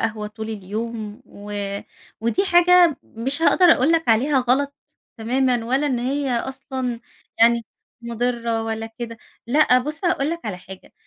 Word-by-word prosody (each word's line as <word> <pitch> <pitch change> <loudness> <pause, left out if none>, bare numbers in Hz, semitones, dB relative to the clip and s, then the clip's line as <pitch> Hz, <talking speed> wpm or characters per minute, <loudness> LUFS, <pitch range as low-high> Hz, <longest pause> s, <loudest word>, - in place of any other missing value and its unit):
قهوة 215 -1 -2
طول 220 +1 -7
اليوم 215 +2 -5
و 205 +1 -10 0.7
ودي 235 - +1
حاجة 355 -1 +6
م 230 - -11
مش 285 +4 -2
هاقدر 365 - +4
أقول 285 +6 +2
لك 325 -5 +1
عليها 265 +6 +3
غلط 270 +3 +1 0.4
تمامًا 245 +1 +1
ولا 265 +5 +1
إن 255 -4 0
هي 270 +2 -1
أصلًا 260 -1 -3 0.4
يعني 235 0 +5 0.4
مُضرّة 235 -1 -2
ولا 225 0 -4
كده. 230 -1 -6 0.3
لأه 255 -1 +4
بُصّ 300 +7 -5
هاقول 305 -3 +1
لك 335 0 -4
على 205 -5 -3
حاجة، 185 +1 -13
245 Hz, 150 wpm, -22 LUFS, 225-280 Hz, 0.7 s, حاجة